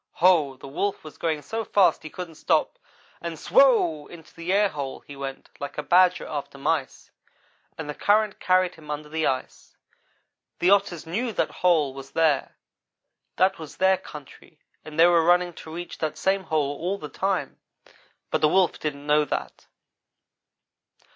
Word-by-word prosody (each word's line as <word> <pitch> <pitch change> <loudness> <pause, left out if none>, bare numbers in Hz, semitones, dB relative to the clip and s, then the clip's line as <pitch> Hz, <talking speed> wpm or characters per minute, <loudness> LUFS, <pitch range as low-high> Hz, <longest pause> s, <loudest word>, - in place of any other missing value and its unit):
Ho! 160 -7 +3
the 135 - -11
Wolf 195 +9 -2
was 155 - -12
going 155 -3 -1
so 225 +8 -3
fast 200 -3 +3
he 155 - -8
couldn't 175 0 -7
stop, - - 0 0.4
and 170 -1 -5
SWOW! 170 - +3
into 165 -2 -14
the 165 +1 -8
airhole 185 -10 0
he 145 - -10
went 135 -1 -7
like 140 0 -6
a 150 - -2
badger 180 +2 +4
after 145 -2 -6
mice, 140 -1 -2 0.7
and 160 - -6
the 150 - -4
current 210 +4 +2
carried 185 -1 +2
him 155 -2 -15
under 150 0 -5
the 160 0 0
ice. 130 -1 -4 0.8
The 180 +2 +3
Otters 195 -5 +2
knew 225 +9 -2
that - - 0
hole 160 -7 +2
was 135 0 -10
there. 160 -3 +1 0.8
That 190 0 +2
was 160 -2 -10
their 190 0 +4
country 150 +1 -13 0.3
and 155 +1 -8
they 165 - +8
were 170 -1 +5
running 175 +1 +3
to 160 - -11
reach 175 +1 -7
that 155 -1 -2
same 190 +2 0
hole 145 -3 0
all 185 +4 -2
the 150 - -7
time, 185 -1 -2 0.7
but - - 0
the 155 - +5
Wolf 185 +1 +2
didn't 145 -2 -4
know 150 0 +4
that. - - -5
160 Hz, 165 wpm, -25 LUFS, 150-185 Hz, 0.8 s, they